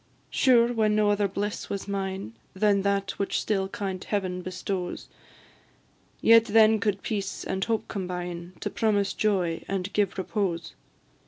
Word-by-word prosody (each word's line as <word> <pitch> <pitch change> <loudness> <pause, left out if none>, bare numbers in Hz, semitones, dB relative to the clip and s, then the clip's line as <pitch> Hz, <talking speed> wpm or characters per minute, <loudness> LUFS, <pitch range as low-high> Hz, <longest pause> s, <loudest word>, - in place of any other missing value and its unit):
Sure, 245 -2 +4
when 215 -2 +2
no 210 -1 +3
other 205 0 +2
bliss 205 +2 -4
was 200 0 -4
mine 190 - -3 0.2
Than 200 0 +3
that 200 0 0
which 200 - 0
still 195 -3 0
kind 190 -2 -4
Heaven 185 -3 -2
bestows, 185 0 -4 1.1
Yet 230 0 +7
then 220 0 +5
could 200 -1 -1
peace 205 -3 -3
and 190 0 -2
hope 225 0 -1
combine 180 -2 -5
To - - -3
promise 205 -3 +1
joy 185 -6 0
and 195 0 -3
give 205 -3 +1
repose. 185 -4 -2
200 Hz, 145 wpm, -27 LUFS, 185-210 Hz, 1.1 s, Yet